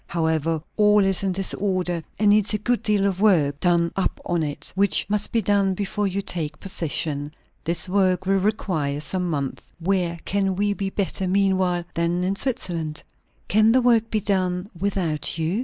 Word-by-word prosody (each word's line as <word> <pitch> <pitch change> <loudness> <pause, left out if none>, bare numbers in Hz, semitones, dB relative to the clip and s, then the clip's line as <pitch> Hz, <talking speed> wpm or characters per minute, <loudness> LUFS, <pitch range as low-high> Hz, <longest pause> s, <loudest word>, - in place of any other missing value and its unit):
However, 160 -1 -1
all 210 -1 +5
is 195 -1 +1
in 195 -2 0
disorder, 185 -2 -1 0.2
and 205 0 +4
needs 210 0 +3
a - - +1
good 240 +3 0
deal 205 -2 +1
of 195 -1 -1
work 155 -9 +3
done 170 -1 +2
up 195 - -1
on 175 -1 0
it; 150 0 -3
which 200 +1 +2
must 210 -1 +1
be 230 -2 +1
done 195 -1 +2
before 205 +1 -1
you 195 +1 -2
take 165 -6 -2
possession. 150 -5 -2 0.3
This 170 +2 +1
work 185 -1 +1
will 195 +1 +2
require 180 -8 -1
some 180 +4 -3
months. 140 -4 -3 0.2
Where 175 -1 0
can 195 -1 0
we 205 +1 +1
be 195 -1 -3
better, 195 -1 -2
meanwhile, 185 -2 +2
than 170 +2 0
in 190 +2 0
Switzerland?" 170 - -2 0.4
"Can 215 +2 +4
the 255 - +4
work 230 -2 +3
be 215 - 0
done 185 -2 0
without 170 -5 -1
you?" 165 +6 -1
185 Hz, 175 wpm, -23 LUFS, 170-200 Hz, 0.4 s, all